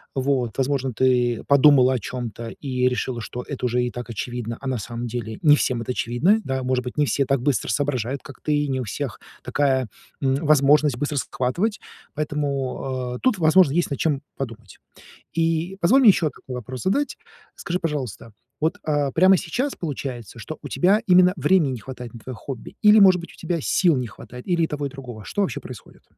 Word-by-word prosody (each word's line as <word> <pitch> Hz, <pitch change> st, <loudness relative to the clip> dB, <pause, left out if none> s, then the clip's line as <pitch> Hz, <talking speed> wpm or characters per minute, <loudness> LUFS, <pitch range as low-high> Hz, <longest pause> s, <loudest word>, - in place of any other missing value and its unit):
Вот, 130 Hz, -3 st, 0 dB
возможно, 135 Hz, -1 st, 0 dB
ты 125 Hz, -1 st, +2 dB
подумала 140 Hz, -2 st, +6 dB
о 130 Hz, -, 0 dB
чём-то 115 Hz, +1 st, -6 dB
и 125 Hz, 0 st, -1 dB
решила, 125 Hz, -1 st, -2 dB
что 125 Hz, +2 st, -6 dB
это 135 Hz, -3 st, -4 dB
уже 125 Hz, +1 st, +1 dB
и 125 Hz, -, -2 dB
так 120 Hz, -1 st, -7 dB
очевидно, 115 Hz, 0 st, -4 dB
а 135 Hz, -, -5 dB
на 130 Hz, -3 st, -1 dB
самом 120 Hz, +3 st, -5 dB
деле 115 Hz, -2 st, -5 dB
не 150 Hz, -2 st, +7 dB
всем 125 Hz, -4 st, 0 dB
это 125 Hz, -, -3 dB
очевидно. 135 Hz, -, +2 dB
Да, 130 Hz, -1 st, -2 dB
может 125 Hz, 0 st, 0 dB
быть, 125 Hz, +3 st, -7 dB
не 150 Hz, -, +3 dB
все 140 Hz, 0 st, +1 dB
так 135 Hz, -1 st, +1 dB
быстро 140 Hz, -2 st, 0 dB
соображают, 135 Hz, -2 st, -1 dB
как 140 Hz, -, -12 dB
ты, 150 Hz, -1 st, 0 dB
не 130 Hz, -1 st, -1 dB
у -, -, -3 dB
всех 125 Hz, +3 st, -5 dB, 0.2 s
такая, 130 Hz, -1 st, +1 dB, 0.3 s
м, 135 Hz, -1 st, +2 dB
возможность 150 Hz, -2 st, +4 dB
быстро 145 Hz, +2 st, -2 dB
схватывать, 170 Hz, -, -1 dB, 0.4 s
поэтому, 135 Hz, -4 st, -2 dB
э, -, -, -13 dB
тут, 255 Hz, -5 st, +2 dB
возможно, 160 Hz, -2 st, +5 dB
есть 175 Hz, -1 st, 0 dB
над 140 Hz, -, -3 dB
чем 150 Hz, -4 st, 0 dB, 0.2 s
подумать. 115 Hz, -6 st, -7 dB, 0.5 s
И 165 Hz, +3 st, 0 dB
позволь 235 Hz, +11 st, +5 dB
мне 240 Hz, -, +8 dB
ещё 170 Hz, -5 st, +3 dB
такой 130 Hz, -, -9 dB
вопрос 125 Hz, +1 st, -6 dB
задать. 280 Hz, +10 st, 0 dB, 0.4 s
Скажи, 175 Hz, +1 st, -3 dB
пожалуйста, 140 Hz, -, -4 dB, 0.3 s
вот, 160 Hz, +1 st, +1 dB
э, 145 Hz, -2 st, +1 dB
прямо 185 Hz, +3 st, +6 dB
сейчас 245 Hz, -, -2 dB
получается, 125 Hz, -, -6 dB
что 155 Hz, +7 st, -7 dB
у -, -, -6 dB
тебя 195 Hz, +4 st, +3 dB
именно 180 Hz, 0 st, +6 dB
времени 180 Hz, -8 st, +3 dB
не 125 Hz, -, -5 dB
хватает 125 Hz, +1 st, -9 dB
на 115 Hz, -, -9 dB
твоё 130 Hz, +3 st, -7 dB
хобби? 130 Hz, +1 st, -8 dB
Или, 210 Hz, 0 st, +7 dB
может 190 Hz, -3 st, +7 dB
быть, 170 Hz, -, -11 dB
у -, -, -16 dB
тебя 170 Hz, 0 st, -2 dB
сил 170 Hz, 0 st, +3 dB
не 125 Hz, -1 st, -2 dB
хватает? 125 Hz, +3 st, -12 dB
Или 175 Hz, -2 st, +2 dB
и -, -, +2 dB
того, 145 Hz, -1 st, -3 dB
и -, -, -9 dB
другого? 125 Hz, -6 st, -9 dB
Что 205 Hz, -, -2 dB
вообще 145 Hz, -12 st, -1 dB
происходит? -, -, -12 dB
135 Hz, 200 wpm, -23 LUFS, 125-160 Hz, 0.5 s, мне